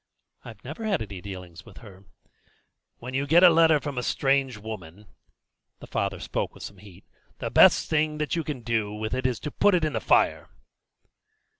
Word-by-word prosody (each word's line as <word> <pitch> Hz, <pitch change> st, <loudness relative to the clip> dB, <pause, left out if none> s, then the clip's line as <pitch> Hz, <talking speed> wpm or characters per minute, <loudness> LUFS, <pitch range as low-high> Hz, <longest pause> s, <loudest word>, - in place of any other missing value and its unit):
"I -, -, -10 dB
never 225 Hz, -, -8 dB
had 200 Hz, -, 0 dB
any 100 Hz, -3 st, -9 dB
dealings 90 Hz, -2 st, -9 dB
with 110 Hz, -4 st, -16 dB
her." 100 Hz, -3 st, -14 dB, 0.9 s
"When 125 Hz, +2 st, -8 dB
you 140 Hz, +2 st, -1 dB
get 170 Hz, +5 st, +5 dB
a 180 Hz, -, +9 dB
letter 160 Hz, -2 st, +5 dB
from 140 Hz, -3 st, -4 dB
a -, -, -2 dB
strange 135 Hz, -1 st, 0 dB
woman" 105 Hz, -3 st, -9 dB, 0.7 s
the -, -, -12 dB
father -, -, -3 dB
spoke -, -, -4 dB
with -, -, -11 dB
some 100 Hz, -, -9 dB
heat 95 Hz, -3 st, -16 dB, 0.3 s
"the -, -, -5 dB
best -, -, +6 dB
thing 155 Hz, -1 st, 0 dB
that 150 Hz, +1 st, -2 dB
you 165 Hz, -, -1 dB
can 145 Hz, -5 st, -5 dB
do 110 Hz, -3 st, -1 dB
with 110 Hz, +2 st, -4 dB
it 130 Hz, 0 st, 0 dB
is 125 Hz, -3 st, -3 dB
to 150 Hz, -, -5 dB
put 205 Hz, -2 st, +3 dB
it 170 Hz, -3 st, +1 dB
in 150 Hz, -, -2 dB
the 110 Hz, -, -2 dB
fire." -, -, +2 dB
125 Hz, 195 wpm, -26 LUFS, 105-150 Hz, 0.9 s, a